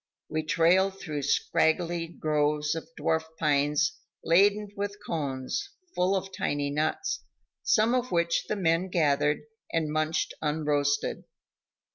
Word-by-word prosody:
We 155 0 -1
trailed 185 +5 +3
through 150 -5 -4
straggly 165 +4 +1
groves 150 -2 0
of 165 +6 -6
dwarf 160 0 +1
pines 150 0 +1 0.2
laden 200 +4 +4
with 200 0 -3
cones, 145 - -3 0.2
full 185 +2 +2
of 195 0 -3
tiny 145 0 -1
nuts, 155 - -1 0.4
some 220 +2 +3
of 250 0 0
which 170 -1 +1
the - - -1
men 175 -1 +1
gathered 150 -3 +2 0.3
and 160 -2 0
munched 155 +1 0
unroasted. 150 -2 0
160 Hz, 120 wpm, -28 LUFS, 150-185 Hz, 0.4 s, laden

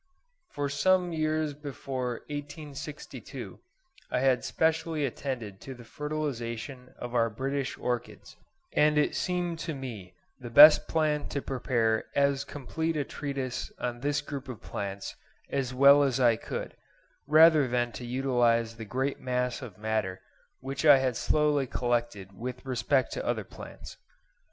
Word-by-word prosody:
For 145 -1 -2
some 180 +5 +2
years 155 -1 0
before 135 -4 -5
1862 145 0 -7 0.5
I - - 0
had 130 -1 +3
specially 160 -1 0
attended 120 -7 -5
to 135 - -8
the 120 - -12
fertilisation 125 -3 -5
of 120 0 -7
our 115 -1 +3
British 135 +4 -3
orchids; 120 -1 -4 0.4
and 150 0 +4
it 150 - +2
seemed 175 -2 -1
to 165 -2 -4
me 110 -10 -8 0.2
the 120 -2 -8
best 150 +6 +9
plan 155 -2 0
to 140 - -2
prepare 115 -4 0
as 140 -1 +2
complete 160 +4 -3
a 145 - +1
treatise 135 -3 -4
on 120 -1 -3
this 145 +2 0
group 140 -2 -7
of 125 - -6
plants 100 -1 -5 0.4
as 135 -3 -1
well 140 +3 +7
as 135 -2 +1
I 120 -3 +5
could, 110 - -6 0.5
rather 155 -1 +7
than 120 -1 0
to 120 - -8
utilise 120 -2 +1
the 110 - -7
great 130 +6 -2
mass 125 0 -1
of 115 -8 -9
matter 105 -3 -2 0.4
which 135 +3 -4
I 145 -3 +8
had 130 -2 0
slowly 150 0 +2
collected 120 -6 -2
with 125 +2 -6
respect 130 0 +1
to - - -3
other - - -1
plants. - - -11
135 Hz, 145 wpm, -29 LUFS, 120-145 Hz, 0.5 s, best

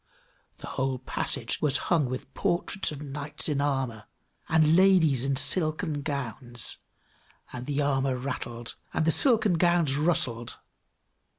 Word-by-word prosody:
The - - -10
whole 130 0 -2
passage - - -2
was 140 -3 +4
hung 160 -5 +1
with 130 +1 -6
portraits 175 +4 0
of 150 -1 -7
knights 145 +1 -4
in 145 -2 0
armor, 135 -6 -2 0.4
and 160 0 +4
ladies 175 -9 +4
in 135 0 0
silken 155 +1 +1
gowns; 130 -4 -3 0.8
and 125 0 -7
the 145 0 0
armor 135 -2 0
rattled, 120 -3 -5 0.2
and 155 - +1
the 165 - +4
silken 220 - +3
gowns 170 -5 +3
rustled! 145 -8 +1
145 Hz, 130 wpm, -27 LUFS, 130-160 Hz, 0.8 s, was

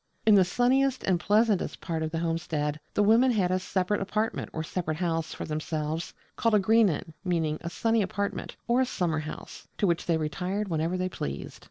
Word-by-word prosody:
In 220 - +6
the 195 -2 +7
sunniest 255 +7 +2
and 185 -2 +2
pleasantest 210 +1 +2
part 165 -1 -3
of 160 - -1
the 165 - -3
homestead 165 -3 -1 0.2
the 205 - +4
women 230 +5 +5
had 195 -7 +2
a 185 - +2
separate 185 +2 -1
apartment 215 +3 -1
or 160 - -3
a - - -5
separate 155 -2 -3
house 165 -2 -1
for - - -5
themselves, 155 +1 -3 0.2
called 230 -2 +2
a - - +6
'Greenan' 195 -6 +2
meaning 165 -4 0
a 170 - -4
'sunny 225 +5 +1
apartment' 200 +1 -3
or 240 +2 +3
a - - +3
summer 165 -7 -1
house; 155 0 -8
to - - +1
which 170 -2 0
they 165 -2 +3
retired 185 +6 -2
whenever 165 +2 0
they 185 0 0
pleased. 70 - -5
180 Hz, 200 wpm, -28 LUFS, 160-210 Hz, 0.2 s, the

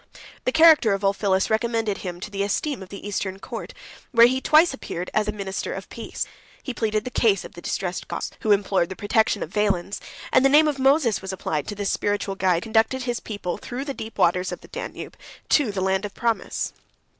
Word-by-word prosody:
The 255 - +2
character 315 -8 +6
of 195 0 -3
Ulphilas 195 0 +1
recommended 220 -2 0
him 175 -2 -6
to 210 - -6
the 200 -1 -3
esteem 225 +6 -1
of 190 - -10
the 200 +1 -8
Eastern 190 -1 -3
court, - - -7 0.4
where 235 -3 +8
he 260 +2 +2
twice 310 +2 +5
appeared 180 -9 -6
as 215 0 +1
the - - +1
minister 200 -1 -4
of - - -7
peace; - - -5 0.4
he 255 - -4
pleaded 215 -2 -1
the 250 - -4
cause 205 -7 +2
of - - -11
the 175 - -10
distressed 180 0 -3
Goths, - - -4
who 215 - 0
implored 195 -3 +2
the 190 - -6
protection 205 +1 +1
of 165 - -9
Valens; 200 -2 0 0.3
and 260 - +6
the 275 - +6
name 305 +3 +6
of 290 -2 -1
Moses 270 -4 +3
was 190 0 -5
applied 155 -5 -3
to 210 - -4
this 205 -1 -1
spiritual 205 -1 -1
guide, 185 -3 +1
who 225 - -8
conducted 225 +4 +2
his 240 -1 -2
people 200 -5 -5
through 255 +3 -5
the 280 - -3
deep 225 -3 -8
waters 180 +2 +2
of - - -6
the - - -14
Danube - - -7 0.3
to 275 -8 +3
the 195 -2 -3
Land 190 +1 +1
of 205 -1 -6
Promise. 230 -1 -1
210 Hz, 220 wpm, -24 LUFS, 190-240 Hz, 0.4 s, where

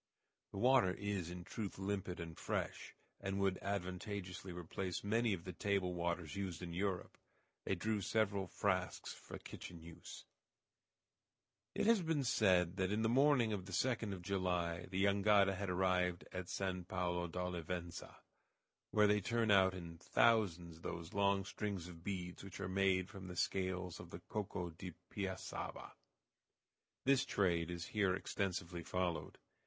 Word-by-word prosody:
The - - -7
water 120 -5 +5
is 100 -4 -2
in 90 0 -6
truth 100 +2 -5
limpid 95 -2 -2
and 85 -1 -6
fresh, - - -3 0.2
and 95 0 -2
would 95 -1 +2
advantageously 95 -1 -3
replace 90 +1 -3
many 115 +3 +2
of 90 -4 -2
the 90 - -6
table 95 +1 +1
waters 85 -1 -2
used 95 -4 -3
in 85 -1 -5
Europe. 95 0 -2 0.5
They 95 - +1
drew 105 +3 0
several 100 -2 +1
frasques - - 0
for - - -9
kitchen 85 - -8
use. 85 0 -10 1.5
It - - +1
has 225 -2 +6
been 160 -4 +1
said 95 -7 +4
that 95 0 +1
in 110 +2 +1
the 110 - +3
morning 130 -3 +5
of 95 -3 -3
the - - -7
2d 115 +1 +1
of 90 -2 -5
July 90 -3 0
the 95 +1 +1
jangada 100 0 +5
had 95 0 -3
arrived 90 -1 +1
at 90 -1 -4
San 95 -2 -1
Pablo 90 -1 -1
d'Olivença, 90 0 -4 0.7
where 105 -1 +5
they 105 0 +4
turn 115 +2 +2
out 95 -1 +6
in 85 -2 -7
thousands 90 -8 +3
those 85 +3 -5
long 100 -1 +3
strings 100 -4 -3
of 85 -2 -11
beads 90 -2 -4
which 100 -1 -8
are 100 - -2
made 95 -1 +2
from 95 -3 -9
the 90 - -6
scales 95 -1 -1
of - - -9
the - - -8
"coco 95 -4 -3
de 85 +2 -7 0.2
piassaba." 95 -2 -4 1.1
This 135 0 +5
trade 85 -9 +1
is 85 -1 -4
here 100 -4 +2
extensively 90 -3 -2
followed. 90 0 -2
95 Hz, 155 wpm, -38 LUFS, 90-100 Hz, 1.5 s, has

